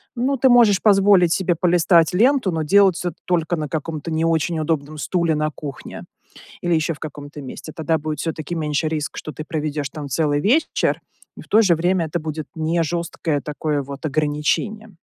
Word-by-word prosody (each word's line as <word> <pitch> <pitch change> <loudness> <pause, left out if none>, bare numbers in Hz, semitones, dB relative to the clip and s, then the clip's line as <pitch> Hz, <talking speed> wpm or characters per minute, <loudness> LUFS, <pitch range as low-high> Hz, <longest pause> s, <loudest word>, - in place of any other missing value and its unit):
ну, 255 +3 0
ты 265 0 +3
можешь 230 -6 +5
позволить 195 -4 +5
себе 180 -1 +1
полистать 170 -1 +3
ленту, 245 +1 +3
но 160 -1 -1
делать 195 +2 +4
это 175 - -1
только 175 -1 0
на 155 -3 -4
каком-то 160 +1 -4
не 160 +1 0
очень 165 0 0
удобном 155 -1 -2
стуле 170 +1 0
на 155 0 -1
кухне 140 -2 -8 0.6
или 175 -1 0
еще 165 +1 +1
в 150 - -14
каком-то 145 -1 -8
месте. 140 +3 -9
Тогда 160 0 0
будет 155 0 -4
всё-таки 160 0 -4
меньше 155 -1 -1
риск, 150 -2 -3
что 155 - -6
ты 155 - -6
проведешь 150 -3 -3
там 145 0 -7
целый 145 +1 +1
вечер, 250 - +1 0.4
и - - -8
в - - -15
то 220 - +5
же 185 -6 +4
время 175 +1 +1
это 160 +2 -3
будет 155 -2 -5
не 160 +1 0
жесткое 165 -2 -2
такое 150 0 -2
вот 140 +2 -8
ограничение. 155 +9 -1
160 Hz, 185 wpm, -21 LUFS, 150-180 Hz, 0.6 s, можешь